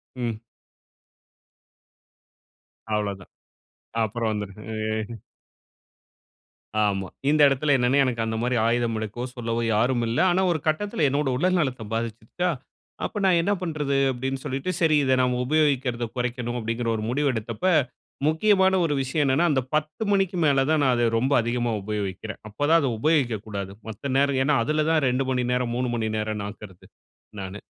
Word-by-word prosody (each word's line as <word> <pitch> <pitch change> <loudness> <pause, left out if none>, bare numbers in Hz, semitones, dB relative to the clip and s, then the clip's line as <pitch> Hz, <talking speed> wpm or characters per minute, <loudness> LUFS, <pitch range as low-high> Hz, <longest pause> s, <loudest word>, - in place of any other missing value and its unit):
ம். 115 -3 -3 2.6
அவ்ளோ 105 -1 -1
தான். - - -16 0.7
அப்புறம் 110 +1 -1
வந்துருது. 105 -1 -5 0.5
அ. 115 - -9 1.7
ஆமா. 95 -2 -1 0.2
இந்த 150 0 +3
இடத்தில 140 +1 +2
என்னனா, 125 +2 +2
எனக்கு 120 -3 -1
அந்த 110 0 -2
மாதிரி 125 +1 0
ஆயுதம் 120 -1 +1
எடுக்கவோ 110 +3 -4
சொல்லவோ 115 -1 -2
யாரும் 120 +2 +2
இல்லை. 115 +9 +1
ஆனா 185 +2 +2
ஒரு 160 - 0
கட்டத்தில 160 0 0
என்னுடைய 140 -2 0
உடல் 185 +4 +2
நலத்தை 130 -7 -1
பாதிச்சிருச்சா? 115 +10 -2 0.6
அப்போ - - -5
நான் 180 -3 +4
என்ன 200 +4 0
பண்றது? 150 -5 -1
அப்படி 130 +1 -3 0.2
சொல்லிட்டு, 135 +7 -2
சரி 160 -2 +4
இத 130 -1 +2
நாம 125 -1 +1
உபயோகிக்கிறத 135 -5 +1
குறைக்கணும் 125 -1 -2
அப்படிங்கிற 115 +1 -3
ஒரு 110 - -3
முடிவு 140 +2 +1
எடுத்தப்ப, 115 +6 -4 0.6
முக்கியமான 190 +3 +3
ஒரு 150 - 0
விஷயம் 135 +3 0
என்னனா, 135 +6 +3
அந்த 130 - +2
10:00 155 +7 -1
மணிக்கு 195 -2 +1
மேல 135 -2 +3
தான் 155 -2 +3
நான், 130 -2 +4
அத 120 -1 +2
ரொம்ப 130 +4 +1
அதிகமாக 120 -2 -1
உபயோகிக்கிறேன். 105 0 -4
அப்பதா 145 +9 +3
அதை 135 - +1
உபயோகிக்கக்கூடாது. 110 -10 0 0.2
மத்த 130 +5 -4
நேரம் 140 -1 +2
என்னென்னா 140 -1 +3
அதில 155 0 +1
தான் 155 -3 +2
2 130 +2 0
மணி 125 -1 0
நேரம், 125 -1 -1
3 125 0 -1
மணி 110 -1 -1
நேரம்ன்னு 105 -1 -3
ஆக்குறது 100 -3 -12 0.5
நானு. 95 +2 -7
125 Hz, 150 wpm, -25 LUFS, 115-150 Hz, 2.6 s, நான்